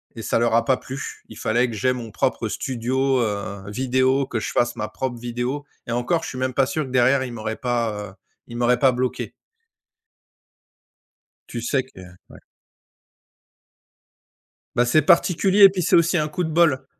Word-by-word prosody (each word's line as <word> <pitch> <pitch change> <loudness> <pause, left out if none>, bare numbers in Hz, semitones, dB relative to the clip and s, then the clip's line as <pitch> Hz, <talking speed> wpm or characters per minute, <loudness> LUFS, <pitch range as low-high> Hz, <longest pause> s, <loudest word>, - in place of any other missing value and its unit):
Et 115 - -7
ça 110 - 0
leur 115 -1 +2
a 115 0 +3
pas 130 +1 +2
plu. 135 +2 -8
Il - - -11
fallait 120 +3 +1
que 115 - -6
j'ai 125 +5 +1
mon 120 -3 -7
propre - - -1
studio, 130 +2 -1
heu, 100 -3 -3
vidéo, 130 +4 +1
que 120 -4 -3
je - - -4
fasse 120 0 +1
ma 105 - -3
propre 120 +3 -4
vidéo 120 +4 -3 0.2
et - - -4
encore, 125 +8 0
je - - -5
suis 130 - -7
même 130 0 -1
pas 135 +1 +3
sûr 155 +3 -2
que - - -9
derrière, 130 +2 +3
ils 125 - -5
m'auraient 110 -1 -4
pas, 115 -5 -2
heu, - - -15 0.3
ils 120 - -8
m'auraient 120 0 +2
pas 135 -1 +5
bloqué. 125 0 -3 2.2
Tu 120 - -5
sais 130 +3 0
que 130 -6 -17 0.3
ouais. - - -14 2.4
Bah, 120 - +3
c'est 155 +6 +4
particulier 190 +3 +4
et 195 - +11
puis 190 -1 -3
c'est - - +3
aussi 170 +1 +3
un 155 -1 0
coup 155 +4 -3
de 160 - -2
bol. 160 -4 +2
125 Hz, 185 wpm, -22 LUFS, 120-135 Hz, 2.4 s, et